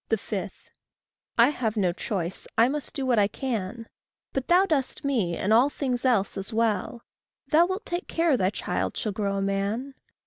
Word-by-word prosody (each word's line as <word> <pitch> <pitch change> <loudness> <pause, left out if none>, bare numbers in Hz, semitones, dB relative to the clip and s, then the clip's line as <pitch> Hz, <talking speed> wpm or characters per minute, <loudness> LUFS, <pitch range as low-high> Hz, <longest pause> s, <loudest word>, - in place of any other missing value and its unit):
5. 210 -2 -2 0.9
I 235 +3 +7
have 225 -6 -2
no 185 -4 +2
choice, 185 -2 -3
I 230 - +6
must 290 +2 -3
do 270 - -2
what 245 -4 +3
I 200 - +4
can; 230 -2 -4 0.5
But 270 -2 -2
thou 360 +2 +5
dost 285 -6 -1
me, 215 -12 0
and 205 +3 +1
all 245 +5 +5
things 260 -4 -2
else 210 -7 +2
as 195 +4 -4
well; 225 0 0 0.5
Thou 335 +2 +5
wilt 375 +3 -4
take 350 +1 -3
care 330 -3 +2
thy 185 -6 +2
child 210 - -3
shall 215 - -1
grow 200 0 -1
a 195 - -1
man. 200 +7 -1
230 Hz, 180 wpm, -26 LUFS, 200-270 Hz, 0.9 s, I